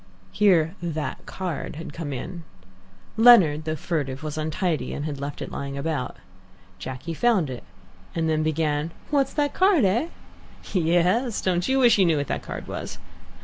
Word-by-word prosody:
Here 175 -6 +3
"that 160 -3 -4
card" 175 -8 -4
had 160 - -7
come 165 -4 -5
in. 170 +6 -6 0.7
Leonard, 190 -11 +7
though 155 0 -1
furtive, 145 -4 -3
was 155 -1 -4
untidy, 155 +2 -1
and 145 -1 -4
left 140 +1 -4
it - - -8
lying 140 0 -5
about. 140 -3 -3 0.6
Jacky 130 - -5
found 190 - +2
it, 125 - -7 0.5
and 165 -1 0
then 155 -1 +1
began, 155 0 0 0.2
"What's 275 -2 +2
that 290 -1 0
card, 370 - +4
eh?" 230 - +2 0.7
"Yes, 180 +7 +2
don't 180 -1 0
you 265 - +2
wish 240 -5 +5
you 190 - +6
knew 160 -2 +3
what 145 - -1
that - - -1
card - - -7
was?" - - -6
165 Hz, 160 wpm, -25 LUFS, 150-195 Hz, 0.7 s, Leonard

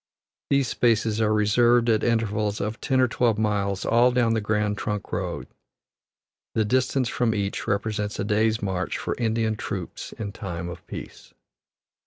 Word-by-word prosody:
These 140 -2 +3
spaces 115 -2 +1
are 110 -1 +3
reserved 120 +3 +4
at 110 -2 +3
intervals 110 -3 0
of 105 +3 -3
ten 130 -1 +1
or 130 - +5
twelve 120 -2 +1
miles 100 -3 0
all 120 +2 +5
down 120 -2 +2
the 110 - 0
Grand 105 0 0
Trunk 105 -1 -3
Road; - - -3 1.1
the 110 - +2
distance 130 +2 +1
from 115 -1 0
each 100 -1 -2
represents 105 0 -1
a - - -1
day's 110 +1 +1
march 95 -2 -2
for - - -2
Indian 110 -1 +1
troops 95 -4 -5
in 105 -2 -5
time 85 -4 -5
of 85 -1 -9
peace. - - -9
110 Hz, 160 wpm, -25 LUFS, 105-115 Hz, 1.1 s, or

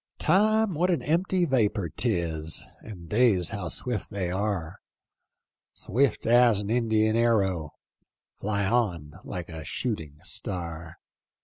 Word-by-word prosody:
" - - -63
Time, 215 0 +3
what 175 +4 +1
an 175 - +1
empty 175 +3 +1
vapor 110 - +1
'tis. 85 -7 -1 0.2
And 90 -6 -10
days 105 -3 +3
how 100 -5 -4
swi£t 115 +3 -3
they 95 -3 -3
are: 95 -4 -2 1.0
Swift 130 +2 0
as 120 -2 +5
an 105 +1 -3
Indian 110 -2 +2
arrow 95 -9 +1 0.3
— - - -49
Fly 100 -1 -1
on 90 -8 -1
lilie 90 -3 -5
a 80 -1 -7
shooting 80 - -4
star. 85 -3 -5
105 Hz, 130 wpm, -27 LUFS, 85-120 Hz, 1.0 s, as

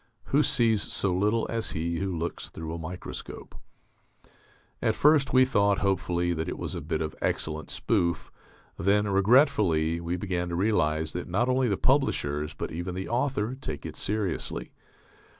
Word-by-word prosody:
(Who 145 - +6
sees 115 -7 +3
so 95 -1 -1
little 105 +5 +1
as 115 -1 -2
he 85 +1 -2
who 95 -3 -2
looks 85 +1 -4
through 80 0 -6
a 85 - -5
microscope?) 90 +3 -7 1.3
At - - +1
first 150 -2 +4
we 130 0 +6
thought, 100 -6 +2
hopefully, 90 -2 0
that 80 0 -3
it - - -4
was - - -4
a - - -4
bit - - -2
of 75 - -4
excellent 80 0 -2
spoof; 95 - 0 0.5
then, 105 +3 +2
regretfully, 95 - +3
we 85 +1 -2
began 90 -2 -2
to 85 - -2
realize 80 -6 +1
that 90 0 -5
not 115 +8 +1
only 130 0 +2
the 100 -4 0
publishers 75 - +1
but - - -4
even 85 +2 -4
the 95 +1 -4
author 120 -1 0
take 105 - -6
it - - -6
seriously. 95 - -2
95 Hz, 165 wpm, -27 LUFS, 85-115 Hz, 1.3 s, Who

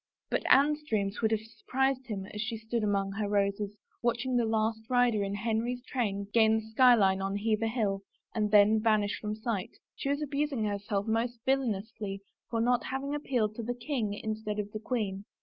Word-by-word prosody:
But - - +1
Anne's 295 +2 +5
dreams 210 -8 -1
would 220 - +3
have 220 -1 +1
surprised 260 +4 -1
him 200 -4 -4
as 210 - -3
she 225 +1 -3
stood 225 +1 -2
among 200 -1 +1
her 205 +1 -2
roses, 200 0 0 0.2
watching 240 +1 0
the 240 -1 +3
last 220 0 +1
rider 245 -4 +3
in 200 0 -2
Henry's 230 +3 -1
train 205 -8 -1
gain 220 -1 +5
the 220 0 -2
sky 250 +2 +7
line 195 -3 +3
on 195 +1 -1
Hever 220 +1 +1
Hill 210 -4 0 0.3
and 210 -2 0
then 210 +1 +6
vanish 215 -1 +2
from 210 0 -3
sight, 215 -3 -3
— - - -64
she 275 - -3
was 285 +2 0
abusing 285 -4 -1
herself 200 0 -2
most 230 +2 0
villainously 220 -6 -1 0.3
for 230 - -1
not 245 +1 +2
having 270 +2 -3
appealed 245 -7 0
to - - -2
the 245 +2 -3
king 240 -5 -2
instead 215 0 -4
of 205 -1 -3
the 215 - -5
queen. 210 -4 -2
220 Hz, 195 wpm, -30 LUFS, 205-245 Hz, 0.3 s, sky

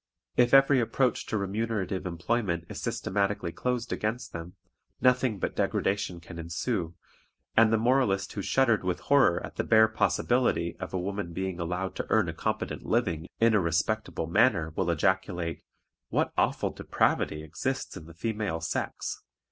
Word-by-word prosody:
If 120 0 +4
every 135 0 +6
approach 125 +1 0
to 110 - -1
remunerative 100 -2 -2
employment 85 0 -1
is - - -6
systematically 100 -2 -1
closed 125 +4 -2
against 115 +4 -3
them, 85 +2 -7 0.4
nothing 125 -3 +3
but - - -3
degradation 95 -3 0
can 85 0 -10
ensue, 85 +1 -2 0.6
and 110 0 +6
the 110 - +4
moralist 110 -5 +2
who 100 - -3
shuddered 115 -1 +2
with 90 -1 -1
horror 135 -12 +4
at - - -12
the - - +1
bare 110 -1 +6
possibility 110 -5 +1
of - - -5
a - - -1
woman 100 -1 -4
being 95 0 -3
allowed 90 +2 -3
to - - -3
earn - - +3
a - - -4
competent - - -3
living 90 -8 0
in 115 0 +4
a 105 - +5
respectable 90 +3 -1
manner 85 -3 +2
will 95 -2 0
ejaculate, 90 -1 0 0.5
"What - - 0
awful - - +1
depravity 75 0 0
exists 85 - -3
in 80 - -9
the 85 - -13
female 105 -3 -2
sex!" 80 - -3
100 Hz, 155 wpm, -28 LUFS, 85-115 Hz, 0.6 s, every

